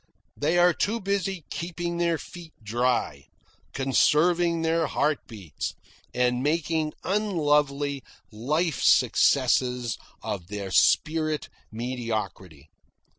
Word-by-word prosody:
They 160 Hz, +4 st, 0 dB
are 175 Hz, 0 st, +5 dB
too 215 Hz, +7 st, -1 dB
busy 195 Hz, -4 st, -2 dB
keeping 170 Hz, 0 st, -4 dB
their 170 Hz, -1 st, +1 dB
feet 170 Hz, 0 st, -11 dB
dry, 115 Hz, -, -1 dB, 0.4 s
conserving 165 Hz, +5 st, +2 dB
their 165 Hz, 0 st, +1 dB
heart 150 Hz, +1 st, 0 dB
beats, 100 Hz, -, -6 dB, 0.4 s
and 125 Hz, 0 st, +1 dB
making 155 Hz, +1 st, 0 dB
unlovely 150 Hz, -8 st, +1 dB, 0.3 s
life 150 Hz, +9 st, -1 dB
successes 125 Hz, -3 st, +3 dB, 0.2 s
of 90 Hz, -4 st, -4 dB
their 100 Hz, -1 st, -5 dB
spirit 155 Hz, +6 st, +2 dB, 0.2 s
mediocrity. 110 Hz, -, -5 dB
150 Hz, 95 wpm, -26 LUFS, 120-170 Hz, 0.4 s, are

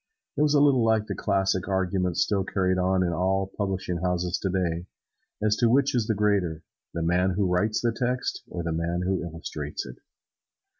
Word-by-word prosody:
It -, -, 0 dB
was 150 Hz, 0 st, +3 dB
a -, -, +6 dB
little 140 Hz, -4 st, +4 dB
like 110 Hz, -1 st, +2 dB
the -, -, -4 dB
classic 95 Hz, -2 st, 0 dB
argument 95 Hz, -2 st, 0 dB
still 100 Hz, -3 st, +2 dB
carried 95 Hz, -1 st, 0 dB
on 95 Hz, 0 st, +2 dB
in 85 Hz, -, 0 dB
all 95 Hz, +2 st, 0 dB
publishing 95 Hz, -3 st, -2 dB
houses, 90 Hz, 0 st, -1 dB, 1.0 s
as 105 Hz, -1 st, +3 dB
to 120 Hz, -2 st, +3 dB
which 140 Hz, +3 st, +3 dB
is 120 Hz, -4 st, +1 dB
the 110 Hz, -, +1 dB
greater: 100 Hz, -6 st, +1 dB, 0.3 s
the 85 Hz, -, -3 dB
man 90 Hz, +2 st, +2 dB
who 100 Hz, -, +1 dB
writes 100 Hz, +5 st, +1 dB
the 120 Hz, -, +2 dB
text 125 Hz, +2 st, -2 dB
or 85 Hz, -, -4 dB
the 85 Hz, -, -2 dB
man 85 Hz, +2 st, -1 dB
who 95 Hz, 0 st, 0 dB
illustrates 80 Hz, -3 st, -5 dB
it. -, -, -10 dB
95 Hz, 185 wpm, -26 LUFS, 90-105 Hz, 1.0 s, a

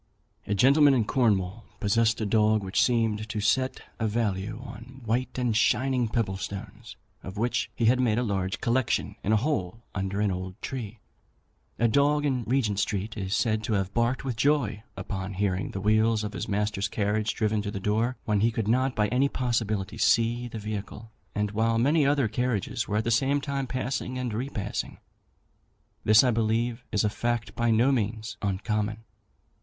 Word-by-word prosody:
A 105 Hz, -, 0 dB
gentleman 140 Hz, +6 st, +6 dB
in 115 Hz, -4 st, +2 dB
Cornwall 105 Hz, -4 st, +1 dB, 0.2 s
possessed 115 Hz, +2 st, +2 dB
a -, -, 0 dB
dog, 110 Hz, 0 st, +3 dB
which 95 Hz, 0 st, +1 dB
seemed 110 Hz, -3 st, +1 dB
to 110 Hz, -, -3 dB
set 130 Hz, +6 st, +1 dB, 0.2 s
a 110 Hz, -, +1 dB
value 105 Hz, -1 st, -1 dB
on 125 Hz, +2 st, -11 dB
white 120 Hz, +4 st, -1 dB
and 125 Hz, -3 st, 0 dB
shining 125 Hz, +2 st, +2 dB
pebble 105 Hz, -4 st, -1 dB
stones, 95 Hz, +1 st, -7 dB, 0.3 s
of 95 Hz, +2 st, -8 dB
which 120 Hz, +3 st, 0 dB
he 115 Hz, -, 0 dB
had 125 Hz, +3 st, +4 dB
made 115 Hz, -4 st, +2 dB
a 125 Hz, -, +1 dB
large 95 Hz, -4 st, -2 dB
collection 120 Hz, +1 st, 0 dB
in 105 Hz, -, 0 dB
a -, -, +5 dB
hole 115 Hz, -, -2 dB
under 95 Hz, +1 st, -2 dB
an 105 Hz, -1 st, +2 dB
old 95 Hz, +2 st, -5 dB
tree. 120 Hz, -5 st, -5 dB, 0.8 s
A 115 Hz, -, +3 dB
dog 145 Hz, +5 st, +3 dB
in 130 Hz, -5 st, 0 dB
Regent 115 Hz, -5 st, +1 dB
Street 105 Hz, 0 st, -2 dB
is 95 Hz, -2 st, -2 dB
said 110 Hz, -2 st, +1 dB
to 110 Hz, -, -1 dB
have 95 Hz, -1 st, -1 dB
barked 120 Hz, +3 st, 0 dB
with 130 Hz, -3 st, -2 dB
joy 120 Hz, -5 st, +1 dB, 0.3 s
on 95 Hz, 0 st, -3 dB
hearing 95 Hz, -1 st, -1 dB
the 95 Hz, -, -5 dB
wheels 110 Hz, +2 st, +2 dB
of 105 Hz, 0 st, -4 dB
his -, -, -4 dB
master's 105 Hz, 0 st, -1 dB
carriage 105 Hz, +1 st, -1 dB
driven 110 Hz, -1 st, +1 dB
to 100 Hz, -, -4 dB
the 100 Hz, -, -4 dB
door, 110 Hz, +6 st, 0 dB
when 105 Hz, -2 st, +1 dB
he 110 Hz, +3 st, +3 dB
could 115 Hz, -2 st, -2 dB
not 130 Hz, +3 st, +2 dB
by 105 Hz, -1 st, +2 dB
any 135 Hz, +3 st, +2 dB
possibility 110 Hz, -7 st, -1 dB
see 120 Hz, +1 st, +2 dB
the 115 Hz, -, -7 dB
vehicle, 105 Hz, +1 st, -6 dB, 0.2 s
and 105 Hz, 0 st, 0 dB
while 115 Hz, +2 st, +1 dB
many 145 Hz, +5 st, +3 dB
other 140 Hz, -4 st, +2 dB
carriages 120 Hz, -1 st, -1 dB
were 105 Hz, -, 0 dB
at 110 Hz, -, +1 dB
the 135 Hz, +5 st, +2 dB
time 140 Hz, -1 st, -3 dB
passing 130 Hz, 0 st, -3 dB
and 125 Hz, -3 st, -3 dB
repassing. 115 Hz, -3 st, -4 dB, 1.1 s
This, 110 Hz, +3 st, +6 dB
I 125 Hz, -, +3 dB
believe, 115 Hz, +2 st, 0 dB
is 105 Hz, -3 st, +1 dB
a -, -, +3 dB
fact 115 Hz, -2 st, -2 dB
by 120 Hz, 0 st, +1 dB
no 115 Hz, +4 st, +4 dB
means 110 Hz, -3 st, -2 dB
uncommon. 105 Hz, +2 st, -2 dB
110 Hz, 180 wpm, -27 LUFS, 105-125 Hz, 1.1 s, gentleman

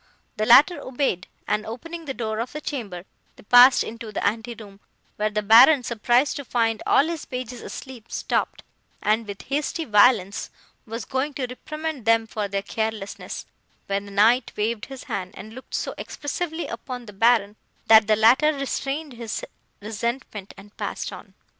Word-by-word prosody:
The 215 Hz, 0 st, 0 dB
latter 290 Hz, +9 st, +7 dB
obeyed, 255 Hz, -9 st, -2 dB, 0.2 s
and, 210 Hz, +1 st, 0 dB
opening 330 Hz, +10 st, -7 dB
the 270 Hz, -, -4 dB
door 220 Hz, -2 st, -3 dB
of 235 Hz, +2 st, -4 dB
the 300 Hz, -, -4 dB
chamber, 210 Hz, -, -5 dB, 0.3 s
they -, -, -17 dB
passed 245 Hz, +4 st, +7 dB
into 230 Hz, -1 st, -8 dB
the -, -, -3 dB
ante 225 Hz, +3 st, -1 dB
room, 200 Hz, -3 st, -13 dB, 0.4 s
where 215 Hz, 0 st, +1 dB
the 210 Hz, 0 st, -2 dB
Baron, 250 Hz, +6 st, +7 dB
surprised 240 Hz, +4 st, +1 dB
to 285 Hz, -, -5 dB
find 230 Hz, -3 st, 0 dB
all 280 Hz, -, +5 dB
his 330 Hz, -1 st, -4 dB
pages 250 Hz, -1 st, -6 dB
asleep, 250 Hz, -4 st, -9 dB
stopped, -, -, -2 dB, 0.4 s
and, 215 Hz, +1 st, +1 dB
with 200 Hz, -1 st, -7 dB
hasty 300 Hz, +4 st, -2 dB
violence, 210 Hz, -3 st, +3 dB, 0.4 s
was 225 Hz, 0 st, -5 dB
going 270 Hz, +2 st, -2 dB
to 265 Hz, -, -2 dB
reprimand 305 Hz, +1 st, -6 dB
them 225 Hz, 0 st, +4 dB
for 215 Hz, -2 st, -3 dB
their 195 Hz, 0 st, -3 dB
carelessness, 220 Hz, -1 st, -4 dB, 0.4 s
when 200 Hz, 0 st, -2 dB
the 200 Hz, -, -11 dB
Knight 225 Hz, +5 st, +3 dB
waved 215 Hz, +1 st, -1 dB
his 270 Hz, -2 st, -9 dB
hand, 185 Hz, -1 st, -5 dB
and 220 Hz, +1 st, -10 dB
looked 260 Hz, +2 st, -8 dB
so -, -, -2 dB
expressively 320 Hz, +3 st, -4 dB
upon 250 Hz, -3 st, -7 dB
the 210 Hz, -, -11 dB
Baron, 210 Hz, 0 st, +3 dB, 0.3 s
that 220 Hz, -1 st, +7 dB
the 215 Hz, -, +4 dB
latter 250 Hz, +8 st, +5 dB
restrained 275 Hz, +1 st, -3 dB
his 235 Hz, -, -5 dB, 0.4 s
resentment, 220 Hz, -1 st, -4 dB
and 205 Hz, +1 st, -15 dB
passed -, -, -4 dB
on. -, -, -12 dB
230 Hz, 170 wpm, -24 LUFS, 210-265 Hz, 0.4 s, latter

